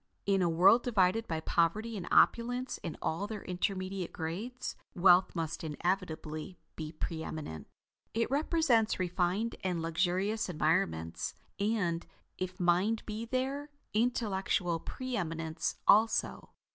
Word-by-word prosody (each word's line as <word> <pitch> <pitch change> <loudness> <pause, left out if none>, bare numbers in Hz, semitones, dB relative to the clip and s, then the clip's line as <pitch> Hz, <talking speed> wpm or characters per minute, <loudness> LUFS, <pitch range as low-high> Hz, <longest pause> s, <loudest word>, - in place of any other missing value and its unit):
In 195 -1 +3
a 175 - +3
world 190 +8 +6
divided 220 -1 +2
by 160 -1 -2
poverty 210 +9 +1
and 185 -4 -5
opulence 245 +2 +3
into 165 - -6
all 180 +6 -1
their 210 -2 -6
intermediate 185 0 -2
grades, 215 +11 -4 0.2
wealth 180 +1 +5
must 165 +2 -3
inevitably 160 0 -3 0.2
be 155 -1 -5
pre 160 0 -4
eminent. 145 - -6 0.5
It 230 +2 0
represents 285 -6 +2
refined 185 +5 0
and 180 -2 0
luxurious 180 +6 0
environments, 85 - 0 0.2
and, 200 -5 0 0.4
if 185 0 -4
mind 180 +6 +2
be 220 +1 -4
there, 265 +4 -2 0.2
intellectual 200 -6 +1
pre 255 +8 -5
eminence 165 -3 -2
also. 220 +2 +3
185 Hz, 120 wpm, -32 LUFS, 165-225 Hz, 0.5 s, world